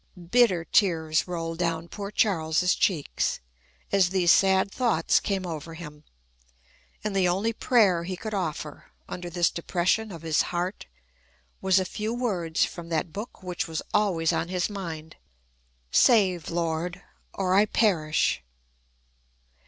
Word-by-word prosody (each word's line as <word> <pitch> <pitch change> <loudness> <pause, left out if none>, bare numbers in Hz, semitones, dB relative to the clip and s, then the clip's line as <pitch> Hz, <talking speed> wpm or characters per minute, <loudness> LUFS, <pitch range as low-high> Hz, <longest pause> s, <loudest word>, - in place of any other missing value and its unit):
Bitter 225 -9 +4
tears 160 -6 +2
rolled 165 -1 -4
down 165 -1 -1
poor 200 +2 -6
Charles's 180 -4 +2
cheeks, 165 -8 0 0.5
as 190 -3 +4
these 180 -2 +3
sad 190 0 +4
thoughts 225 -11 +2
came 195 -2 -2
over 165 -1 -6
him; 150 -3 -10 1.0
and 210 -2 -2
the 190 -2 +3
only 195 +6 0
prayer 210 -8 +3
he 185 +1 -5
could 215 +3 -6
offer, 160 -5 -4 0.2
under 175 -1 -6
this 175 0 +1
depression 185 +5 0
of 165 -3 -9
his 160 -2 +2
heart, 180 +3 -3 0.7
was 190 0 +4
a 185 - -1
few 215 +5 -3
words 180 -10 0
from 170 -1 -9
that 160 0 -2
book 210 -1 -7
which 180 -1 -3
was 160 -1 -4
always 185 -6 +2
on 165 - -1
his 180 +2 -1
mind, 165 -5 -7 0.7
"Save, 190 - +4
Lord, 170 +1 -2 0.3
or 185 -1 0
I 205 +2 +5
perish." 165 - +1
180 Hz, 135 wpm, -26 LUFS, 165-200 Hz, 1.0 s, I